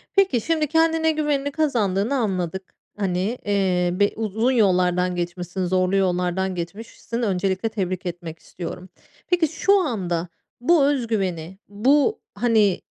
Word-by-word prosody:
Peki, 385 - +3
şimdi 315 +1 0
kendine 320 +1 +2
güvenini 295 -2 -1
kazandığını 235 -7 0
anladık. 190 -6 -2 0.2
Hani, 195 +4 -1
eee, 190 -3 +1
be 205 +2 +2
uzun 220 +3 0
yollardan 180 -5 +2
geçmişsin, 175 +1 -3
zorlu 185 +1 +1
yollardan 185 0 0
geçmişsin, 220 +6 -6
öncelikle 195 0 0
tebrik 185 -4 -3
etmek 170 -2 -6
istiyorum. 180 +1 -8 0.4
Peki, 350 -3 +2
şu 395 +6 +2
anda 180 - -2 0.3
bu 310 +1 +4
öz 275 -4 +1
güveni, 190 -5 -2
bu, 280 - +2 0.2
hani, 220 -6 +2
200 Hz, 125 wpm, -23 LUFS, 180-265 Hz, 0.4 s, bu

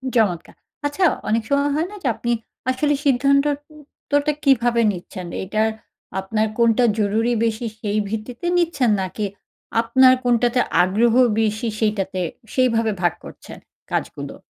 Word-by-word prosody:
চমৎকার। 190 -8 0 0.3
আচ্ছা, 290 +6 -1 0.3
অনেক 225 +1 +1
সময় 280 +1 +2
হয় 320 +4 0
না 420 - -9
যে, - - 0
আপনি 240 - -2 0.4
আসলে 290 +3 +1
সিদ্ধান্তর 280 +2 +3 0.3
উত্তরটা 290 +1 -2
কিভাবে 240 -4 +3
নিচ্ছেন? 180 -1 -8 0.2
এটার 215 +3 0 0.5
আপনার 215 +3 -1
কোনটা 235 +1 +3 0.2
জরুরি 220 +4 +1
বেশি, 225 +1 -2
সেই 210 -1 -2
ভিত্তিতে 225 +8 -5
নিচ্ছেন? 305 -9 +1
নাকি 190 +3 -3 0.6
আপনার 255 +3 +5
কোনটাতে 245 0 +2 0.2
আগ্রহ 220 +5 +2 0.3
বেশি, 215 +2 -1
সেইটাতে 195 -4 -1 0.3
সেইভাবে 230 -4 +2
ভাগ 175 -2 +2
করছেন - - -11 0.3
কাজগুলো? - - -4
235 Hz, 130 wpm, -21 LUFS, 215-265 Hz, 0.6 s, আপনার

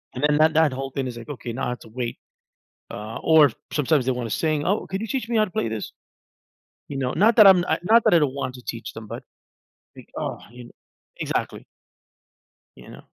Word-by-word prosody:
and 130 - -5
then 150 0 +3
that 155 +1 +4
that 160 -2 +4
whole 135 0 -5
thing 135 -1 -3
is 120 -1 -7
like, 115 +2 -10
okay, 125 -4 -6
now 130 - -3
I - - -2
have 125 - -4
to 115 - -14
wait, 120 +1 -4 0.7
uh, 105 +2 -6
or 155 -5 +6 0.2
sometimes 145 -2 +1
they 130 - +1
wanna 120 -2 -3
sing, 155 +5 -1
oh, 200 +4 0
could 190 +1 -3
you 225 - -4
teach 255 -3 -3
me 230 - +1
how 215 - +4
to 185 - -12
play 115 - -1
this? 110 -2 -5 1.0
You 140 - -6
know, 130 -1 -1
not 215 +7 +3
that 215 -3 +9
I'm 180 -2 +7
I 160 - +1
not 225 +5 +4
that - - +4
I - - +7
don't 140 -2 0
want 130 -2 -4
to 125 - -11
teach 115 -2 -6
them, 110 -1 -9
but - - -7 0.7
like, - - -14
oh, - - -4
you 120 0 -11
kn - - -15 0.5
Exactly. - - -3 1.1
You 65 - -14
know. - - -12
140 Hz, 230 wpm, -23 LUFS, 120-165 Hz, 1.1 s, that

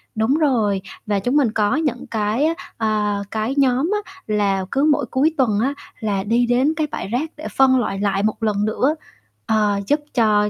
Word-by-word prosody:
đúng 220 +4 +2
rồi, 225 -11 +1 0.2
và 205 -2 0
chúng 245 +8 -1
mình 260 -7 +3
có 215 +3 +1
những 295 -6 -2
cái, 220 +5 0
ơ, 330 - +1 0.2
ờ, 210 -2 0
cái 220 +4 -1
nhóm 270 +5 +2
á - - -14 0.2
là 200 -3 +1
cứ 275 +1 +1
mỗi 295 - +1
cuối 295 +5 +2
tuần 225 -7 +2
á 265 +5 +1 0.3
là 205 -4 -1
đi 235 +4 +2
đến 250 +5 +2
cái 310 -1 -1
bãi - - -4
rác 250 +9 -2
để 310 - -6
phân 260 -1 +5
loại 195 -5 -2
lại 200 -1 0
một 215 +1 -1
lần 210 -1 +1
nữa, 260 +7 +1 0.5
ờ, 210 -2 +1
giúp 290 - +2
cho 210 -3 +3
225 Hz, 200 wpm, -20 LUFS, 210-270 Hz, 0.5 s, phân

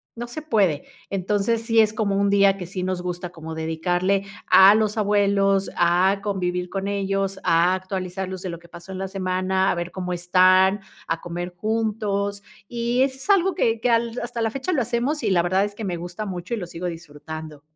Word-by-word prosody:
no 240 +1 -5
se 275 +6 -7
puede. 200 - +1 0.3
Entonces, 205 +4 0
sí 230 -1 +2
es 215 -1 +4
como 205 -2 0
un 200 0 +2
día 200 -1 +4
que 180 - -6
sí 185 +1 -5
nos 185 -1 -2
gusta 180 0 -4
como 160 -2 -8
dedicarle 175 +5 0 0.2
a 195 +2 +8
los 215 0 0
abuelos, 200 -1 +2
a 180 +3 +3
convivir 180 -3 -2
con 195 0 -3
ellos, 195 -1 -1
a 170 +3 +3
actualizarlos 185 0 -5
de 185 - -4
lo 170 - -5
que 170 - -19
pasó 170 +2 -11
en 185 - -5
la 190 - -3
semana, 190 0 0
a - - -1
ver 175 +1 -4
cómo 180 -1 -4
están, 185 +2 +4 0.3
a 165 0 -2
comer 175 +1 -5
juntos, 205 -1 -1 0.3
y 240 +2 0
eso 265 -1 -1
es 335 - -9
algo 385 -1 +4
que 230 -9 +1
que 245 - +1
al 230 +1 +1
hasta 235 -1 -4
la 225 - +1
fecha 275 +8 -3
lo 270 - +2
hacemos 245 +6 -1
y - - +1
la 170 -2 +3
verdad 190 +3 +2
es 205 0 -7
que 220 - -7
me 175 -2 -2
gusta 175 +5 -6
mucho 185 +2 -5
y - - -6
lo 180 - -4
sigo 175 +1 -5
disfrutando. 155 -2 -8
195 Hz, 210 wpm, -23 LUFS, 180-215 Hz, 0.3 s, a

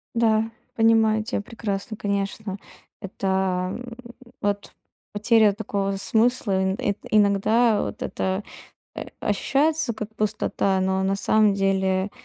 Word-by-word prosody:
Да, 225 -1 +2 0.2
понимаю 225 -1 +3
тя 225 -2 -2
прекрасно. 215 -1 -5
Конечно, 200 0 -3 0.4
это, 195 0 -5 0.6
м, 240 -1 -10 0.4
вот 205 0 -2 0.4
потеря 215 0 +4
такого 200 -2 -2
смысла. 220 -3 +1
Ин 190 0 0
ин 205 - 0 0.2
иногда 215 +2 +3
вот - - -6
это, 190 +2 -2 0.5
э, - - -6
ощущается 275 +5 +1
как 220 0 -7
пустота, 205 -2 0
но 190 0 0
на 195 +1 +1
самом 210 +1 +3
деле 190 0 +1
210 Hz, 120 wpm, -24 LUFS, 195-225 Hz, 0.6 s, потеря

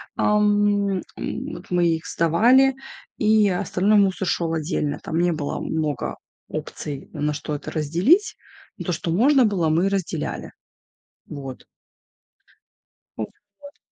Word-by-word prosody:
ам, 205 -2 +2 0.2
м, - - -5
вот - - -10
мы 175 -1 +2
их 160 0 -2
сдавали, 240 +12 +4 0.4
и 215 -1 +4
остальной 195 +3 +2
мусор 190 -1 +1
шел 165 -1 0
отдельно. 155 -2 -1
Там 160 - -3
не 175 0 +3
было 155 -3 -3
много 155 -4 -2 0.3
опций, 145 -2 -6
на 150 -1 -1
что 150 +1 -5
это 145 - -5
разделить, 175 - +2 0.4
но - - -5
то, 180 - -1
что 165 +1 -3
можно 260 - +4
было, 185 -7 +1
мы 170 +5 +2
разделяли. 180 -5 -3 0.7
Вот. 135 -3 -8 1.5
Ну - - -2 0.4
вот. 285 +1 -13
175 Hz, 130 wpm, -23 LUFS, 155-205 Hz, 1.5 s, сдавали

